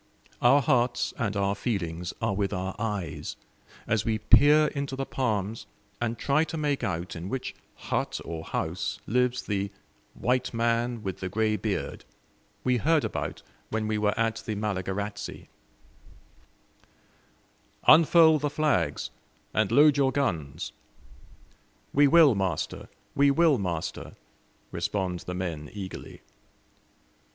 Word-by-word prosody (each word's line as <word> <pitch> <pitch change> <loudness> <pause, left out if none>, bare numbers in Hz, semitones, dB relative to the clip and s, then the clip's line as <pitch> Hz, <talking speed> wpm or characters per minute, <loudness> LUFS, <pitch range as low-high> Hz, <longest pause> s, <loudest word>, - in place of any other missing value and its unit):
Our 135 +4 +5
hearts 120 0 +1
and 105 -4 -1
our 100 0 +1
feelings 90 -6 -3
are - - +1
with 100 0 -1
our 95 0 -3
eyes, 105 -7 -3 0.5
as 110 -2 +1
we 110 -1 0
peer 145 +8 +6
into 140 -2 -4
the 135 0 -3
palms 110 -5 -2 0.3
and 120 -1 -1
try 140 +6 +2
to 165 - -5
make 145 -2 -1
out 85 -1 -3
in 85 +3 -6
which 130 +2 -4 0.2
hut - - -2
or 80 -1 -5
house 90 +5 -3
lives 125 +2 +1
the 100 -1 -2 0.5
"white 125 0 0
man 115 0 0
with 95 -2 -4
the 95 - -4
grey 110 +2 +1
beard" 105 -1 -3 0.6
we 125 -1 +2
heard 155 +5 +2
about - - -4 0.3
when 110 0 -1
we 110 0 0
were 105 0 0
at 115 0 +1
the 110 -2 -4
Malagarazi. 100 0 -4 2.4
"Unfurl 160 0 +7
the 145 +1 -1
flags, 155 0 0 0.4
and 110 -1 +1
load 145 +3 +6
your 135 -2 +3
guns!" 85 - -2 1.2
"We 145 +1 +6
will, 155 -2 +7
master, 95 -3 -2 0.2
we 140 0 +4
will, 155 -2 +4
master!" 85 -4 -4 0.6
respond 95 -3 -2
the 90 - -3
men 80 -5 -4
eagerly. 95 -3 -8
110 Hz, 130 wpm, -27 LUFS, 95-135 Hz, 2.4 s, Unfurl